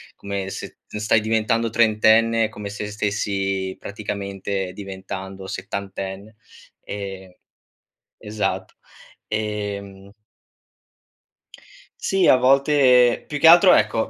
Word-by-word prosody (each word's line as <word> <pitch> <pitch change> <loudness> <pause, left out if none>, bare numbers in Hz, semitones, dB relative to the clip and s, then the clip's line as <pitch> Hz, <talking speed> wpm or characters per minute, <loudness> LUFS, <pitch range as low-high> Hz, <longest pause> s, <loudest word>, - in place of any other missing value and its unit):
come 100 -1 -5
se - - -8
t - - -7
stai 110 +1 +2
diventando 115 +1 0
trentenne, 115 0 +3
è - - -4
come 105 -2 -7
se 105 +1 -6
stessi, 95 -2 -2
praticamente, 100 -2 -5
diventando 95 -1 -8
settantenne. 100 +2 -6 0.5
Ehm 95 -2 -7 0.9
Esatto. 105 0 -3 0.5
Ehm 100 -2 -5 1.9
Sì, 195 -2 +2
a - - +7
volte 130 -1 +4
più 150 - -3
che 160 - +6
altro 175 +3 +8
ecco, 110 - +1
105 Hz, 100 wpm, -22 LUFS, 95-115 Hz, 1.9 s, altro